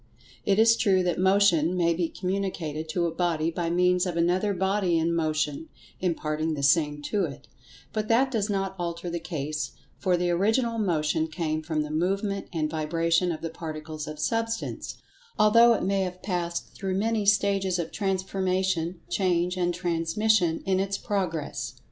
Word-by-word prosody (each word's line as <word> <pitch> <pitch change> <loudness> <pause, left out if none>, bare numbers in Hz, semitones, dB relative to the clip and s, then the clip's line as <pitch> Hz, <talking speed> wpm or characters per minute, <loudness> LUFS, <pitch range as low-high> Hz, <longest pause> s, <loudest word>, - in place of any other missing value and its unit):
It 200 -1 +3
is 225 +1 +6
true 190 -5 +3
that 175 -1 0
Motion 185 -3 +3
may 170 -1 +3
be 165 0 -1
communicated 180 -5 -3
to 170 +2 0
a 165 - -1
body 165 -2 0
by 170 0 -2
means 180 +1 +2
of 175 -2 -3
another 180 +4 +2
body 190 -2 +1
in 165 +1 +1
Motion 155 -2 -1 0.3
imparting 160 -3 -1
the 140 - -4
same 150 0 +2
to 200 +3 0
it, 140 -4 -9 0.5
but 215 -1 -2
that 255 +4 +3
does 215 -3 0
not 195 -1 -1
alter 170 0 -3
the 170 - -2
case, 150 -3 -4 0.3
for 180 -1 +2
the 175 0 0
Original 225 +6 +1
Motion 160 -5 +1
came 155 -1 -2
from 155 -1 -1
the 150 - -6
movement 195 +5 -1
and 160 -4 -1
vibration 165 +3 +1
of 155 - -5
the 165 - -4
Particles 155 -2 -6
of 155 0 -6
Substance, 225 +8 -2 0.4
although 230 +3 +6
it - - -2
may 195 +1 +1
have 180 -1 -4
passed 175 -3 -3
through 190 -2 -3
many 220 +2 +1
stages 200 -2 +2
of 170 -2 -3
transformation, 190 -3 -1
change 180 -2 +1
and 175 -1 +1
transmission 175 +1 +1
in 190 -1 +2
its 195 0 -1
progress. 180 -8 -3
175 Hz, 165 wpm, -26 LUFS, 160-195 Hz, 0.5 s, is